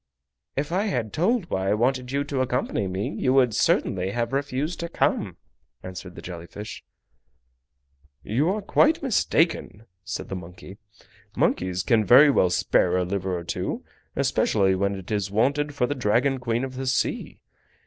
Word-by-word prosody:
"If 145 +3 -2
I 190 +4 +1
had 120 - -2
told 195 +3 +1
why 95 0 0
I - - +3
wanted 125 +2 0
you 140 +1 0
to 140 -2 -2
accompany 125 -5 -1
me 95 +2 -2
you 130 +5 0
would 125 -4 +4
certainly 95 -2 +1
have 115 +4 -2
refused 140 +4 -2
to 170 -1 -4
come," 105 - 0 0.5
answered 90 -1 -8
the - - -10
jelly 85 -1 -8
fish. 105 +3 -8 1.4
"You 135 - +1
are 205 +2 -1
quite 310 +9 +3
mistaken," 165 - +1 0.2
said 95 +1 -5
the 95 - -3
monkey. 90 +2 -10 0.6
"Monkeys 90 0 +1
can 110 +1 +3
very 135 +8 +7
well 90 -9 +3
spare 90 0 +2
a 90 - +1
liver 95 -1 -2
or 85 - -6
two, - - -4 0.3
especially 95 -1 +2
when 100 +1 0
it 95 0 -9
is 105 -2 -1
wanted 140 +8 +1
for 125 - +2
the 145 - -1
Dragon 130 +2 +1
Queen 120 0 -1
of 130 -1 -5
the 135 0 -4
Sea. 130 - -1
120 Hz, 170 wpm, -25 LUFS, 95-140 Hz, 1.4 s, very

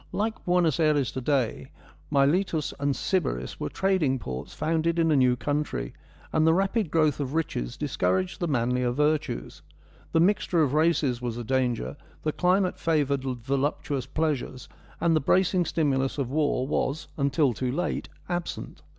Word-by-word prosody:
Like 220 +1 -2
Buenos 175 -4 +2
Ayres 150 -4 +2
to 130 - -4
day, 130 -3 0 0.4
Miletus 150 +3 +2
and 140 -1 0
Sybaris 100 - -1
were - - -2
trading 185 -9 +1
ports 65 - -6
founded 165 +1 0
in 165 -1 +3
a - - +4
new 125 -2 +4
country, 145 +3 -2 0.4
and 155 0 +3
the 160 - +5
rapid 195 0 +1
growth 155 -3 +2
of 140 +1 -3
riches - - -2
discouraged 95 0 0
the 175 - -1
manlier 125 -2 +1
virtues. 150 - -1 0.5
The 165 - +3
mixture 175 -2 +3
of 140 -2 0
races 150 -6 +2
was 120 -2 -3
a 120 - -4
danger, 125 0 -1 0.3
the 155 - +1
climate 180 +3 +1
favoured 145 -4 +1
voluptuous 135 +1 -2
pleasures, 145 -4 -2 0.3
and 165 -1 +3
the 155 - +2
bracing 180 +4 +2
stimulus 135 -5 0
of 135 -3 -2
war 145 -3 +1
was, 145 +1 -1
until 140 -1 +2
too 125 +2 -2
late, 175 +7 -2 0.2
absent. 175 -1 -4
145 Hz, 155 wpm, -27 LUFS, 130-165 Hz, 0.5 s, the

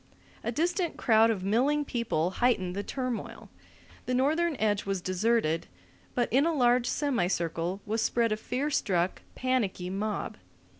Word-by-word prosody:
A 235 - -1
distant 340 - 0
crowd 225 -1 +4
of 205 -5 -1
milling 270 +9 +2
people 200 - -1
heightened 185 -8 +2
the 200 - -1
turmoil. 255 +1 -5 0.6
The 250 - +1
northern 310 +5 +2
edge 210 -4 +1
was 195 -1 -2
deserted, 185 -2 0 0.5
but 245 -1 +2
in 270 +3 +5
a 335 - +1
large 245 -2 +3
semicircle 180 - -1
was 220 +2 -1
spread 230 0 +1
a 215 - +1
fear 260 +7 -2
struck, 180 -8 0
panicky 215 -8 -1
mob. 210 +2 -3
230 Hz, 145 wpm, -29 LUFS, 190-255 Hz, 0.6 s, in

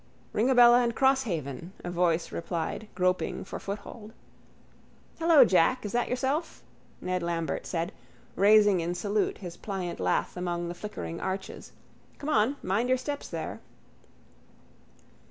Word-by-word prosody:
—Ringabella 245 +1 +6
and 235 -1 -1
Crosshaven, 185 - 0
a 175 - -4
voice 175 -1 +1
replied 170 +5 -4
groping 185 0 0
for - - -6
foothold. 210 +2 -7 1.1
—Hello, 325 -5 +7
Jack, 200 +6 +3
is 205 - -3
that 240 0 0
yourself? 270 +6 -2 0.4
Ned 180 0 -1
Lambert 170 -3 -2
said, 170 +2 -2 0.4
raising 205 -1 +5
in 170 +1 -2
salute 205 +3 0
his 175 -3 -8
pliant 190 -4 -4
lath 90 0 0
among 175 -1 -3
the - - -4
flickering 175 -3 -6
arches. 190 +1 -5 0.5
Come 290 - -5
on. 240 0 +3
Mind 210 +7 0
your 255 - +4
steps 285 +3 -5
there. - - -5
195 Hz, 130 wpm, -28 LUFS, 175-240 Hz, 1.1 s, Hello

